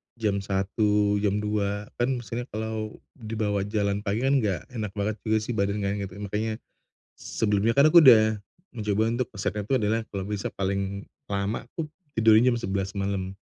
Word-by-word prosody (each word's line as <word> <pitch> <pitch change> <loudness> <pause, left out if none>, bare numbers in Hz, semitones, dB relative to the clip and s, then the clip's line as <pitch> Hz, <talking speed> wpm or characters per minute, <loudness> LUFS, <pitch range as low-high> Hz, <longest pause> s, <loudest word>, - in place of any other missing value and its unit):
jam 105 -4 0
1.00, 100 +1 +1
jam 105 0 0
2.00, 105 -1 -2
kan 125 +2 +1
maksudnya 120 +2 -5
kalau 110 -1 -4 0.2
dibawa 105 -3 -2
jalan 100 -1 0
pagi 105 +3 -2
kan 135 +1 +3
nggak 100 -8 -1
enak 110 -4 -5
banget 105 +1 -2
juga 110 0 +3
sih 115 - -4
badan 100 -1 -1
kan 100 +1 -1
gitu, 100 0 -6
makanya 110 +2 -2 0.6
sebelumnya 105 +1 0
kan 140 +4 +5
aku 170 +2 +8
udah 110 -4 +7 0.4
mencoba 105 -2 0
untuk 125 -1 -1
resepnya 100 +1 -2
tuh 130 +6 +1
adalah 110 +2 +1
kalau 100 -2 -3
besok 105 -1 -3
paling 100 +1 -2 0.3
lama 100 +4 -1
tuh 160 - -1 0.3
tidurnya 115 +3 +6
jam - - 0
11.00 95 -2 -2
malam, 95 -1 -2
105 Hz, 170 wpm, -26 LUFS, 100-110 Hz, 0.6 s, aku